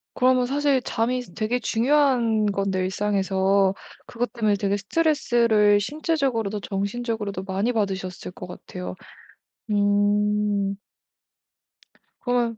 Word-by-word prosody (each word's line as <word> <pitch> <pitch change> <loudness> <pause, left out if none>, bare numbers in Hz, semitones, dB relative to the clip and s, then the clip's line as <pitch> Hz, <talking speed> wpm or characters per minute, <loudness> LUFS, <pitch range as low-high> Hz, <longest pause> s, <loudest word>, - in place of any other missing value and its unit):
그러면 255 -1 +3
사실 280 0 +1
잠이 245 +1 -1
되게 225 +3 -1
중요한 240 -3 +2
건데 195 -1 -1
일상에서 195 0 +1 0.3
그것 245 +1 -3
때문에 215 -4 +1
되게 200 0 0
스트레스를 230 -5 +2
신체적으로도 260 - -1
정신적으로도 200 0 -3
많이 195 +5 -1
받으셨을 190 -5 -3
것 180 - -9
같아요. 180 0 -8 0.7
음. 205 0 +1 1.5
그러면 240 -2 0
210 Hz, 265 characters per minute, -24 LUFS, 200-245 Hz, 1.5 s, 그러면